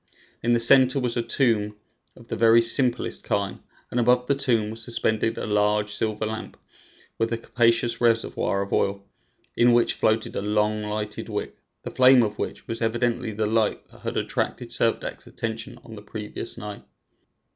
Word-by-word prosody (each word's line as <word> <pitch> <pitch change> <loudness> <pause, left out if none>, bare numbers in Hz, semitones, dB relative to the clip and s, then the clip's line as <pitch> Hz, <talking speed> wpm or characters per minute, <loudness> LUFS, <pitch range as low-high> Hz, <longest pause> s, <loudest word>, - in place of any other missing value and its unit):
In 120 +1 +1
the 120 - +3
center 130 +3 +6
was 125 -2 -2
a 120 - +1
tomb 110 -4 0 0.4
of 115 - -16
the - - -4
very 115 0 +5
simplest 120 +1 +4
kind, 100 -1 -2 0.3
and 120 - 0
above 125 +1 +3
the 140 - +2
tomb 120 -6 0
was 115 +1 -9
suspended 115 -1 -1
a - - -4
large 105 0 +1
silver 110 0 -2
lamp 110 0 -6 0.6
with 115 0 0
a 115 - 0
capacious 115 0 +1
reservoir 115 -4 +1
of 100 - -7
oil, 100 0 0 0.5
in 120 0 +4
which 120 0 +3
floated 110 0 0
a - - -2
long 105 +1 0
lighted 105 0 -5
wick, - - -4 0.3
the - - -6
flame 130 -1 +6
of 105 -1 -3
which - - -5
was 115 0 -5
evidently 120 +1 -1
the 110 +1 -2
light 110 0 0
that - - -17
had - - -4
attracted - - -2
Servadac's - - -2
attention 115 0 -6
on 110 - -11
the 105 - -9
previous 105 0 -5
night. 105 -1 -8
115 Hz, 175 wpm, -24 LUFS, 105-120 Hz, 0.6 s, center